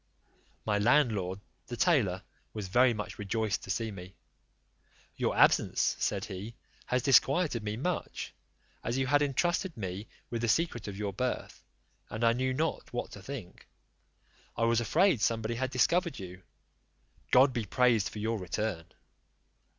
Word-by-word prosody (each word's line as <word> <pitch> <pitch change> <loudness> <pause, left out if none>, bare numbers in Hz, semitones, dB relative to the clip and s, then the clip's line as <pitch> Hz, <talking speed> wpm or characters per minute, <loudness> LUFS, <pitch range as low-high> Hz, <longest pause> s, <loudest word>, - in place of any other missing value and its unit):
My 105 -1 +1
landlord, 105 -6 +2 0.3
the 120 - -6
tailor, 120 - +2 0.3
was 105 -3 -4
very 125 +5 +5
much 105 -1 -5
rejoiced 110 +1 -1
to - - -13
see 110 +3 -1
me: 95 -1 -10 1.0
"Your - - -1
absence," - - +4
said - - -1
he, 100 +5 -7 0.3
"has 125 -1 0
disquieted 135 0 +4
me 105 0 -3
much, 175 +7 -3 0.5
as 115 +3 -1
you 135 - +1
had 145 +2 +3
entrusted 170 +4 0
me 95 0 -5 0.2
with 115 -1 -2
the 115 - 0
secret 120 -3 0
of 100 -1 -6
your 100 -1 -3
birth, 125 +6 -3 0.5
and 110 +2 -4
I 115 0 +5
knew 130 +2 0
not 155 +5 -2
what 120 - -4
to 100 - -10
think; 115 -5 -8 0.9
I - - 0
was 115 0 +3
afraid 155 - +3
somebody 115 0 0
had 130 +3 -2
discovered 170 +7 +2
you; 90 -1 -9 0.9
God 130 +1 +6
be 120 -3 -2
praised 120 0 +2
for - - -10
your 110 +1 -1
return." 90 -1 -3
115 Hz, 150 wpm, -30 LUFS, 105-130 Hz, 1.0 s, God